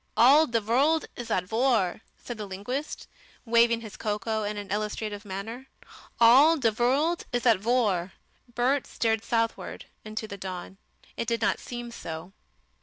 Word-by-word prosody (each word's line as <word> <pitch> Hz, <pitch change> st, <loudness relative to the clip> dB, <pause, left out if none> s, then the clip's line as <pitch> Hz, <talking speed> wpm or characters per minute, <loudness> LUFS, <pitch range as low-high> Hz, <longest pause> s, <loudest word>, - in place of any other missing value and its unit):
"All 285 Hz, +7 st, +7 dB
de 235 Hz, -3 st, +1 dB
vorlt 275 Hz, +9 st, +2 dB
is 240 Hz, -, -7 dB
at 180 Hz, -, +1 dB
vor!" 220 Hz, -2 st, +1 dB, 0.2 s
said 240 Hz, -3 st, -8 dB
the 210 Hz, -, -5 dB
linguist, 245 Hz, +10 st, -5 dB, 0.4 s
waving 235 Hz, 0 st, +4 dB
his 220 Hz, -3 st, -9 dB
cocoa 215 Hz, +1 st, -2 dB
in 210 Hz, 0 st, -3 dB
an 205 Hz, -2 st, -7 dB
illustrative 210 Hz, 0 st, -3 dB
manner, 220 Hz, +7 st, -6 dB, 0.5 s
"all 270 Hz, +8 st, +7 dB
de 235 Hz, -6 st, +2 dB
vorlt 270 Hz, +10 st, +1 dB
is 245 Hz, -1 st, -1 dB
at 230 Hz, -5 st, +5 dB
vor!" 205 Hz, -5 st, +1 dB, 0.4 s
Bert 260 Hz, +3 st, +1 dB
stared 225 Hz, -1 st, 0 dB
southward 230 Hz, -1 st, -2 dB, 0.2 s
into 215 Hz, 0 st, -5 dB
the 200 Hz, -, -7 dB
dawn. 185 Hz, 0 st, -7 dB, 0.4 s
It 230 Hz, -, -3 dB
did 230 Hz, 0 st, 0 dB
not -, -, +1 dB
seem 240 Hz, -1 st, -7 dB
so. 165 Hz, -4 st, -7 dB
230 Hz, 155 wpm, -27 LUFS, 205-245 Hz, 0.5 s, All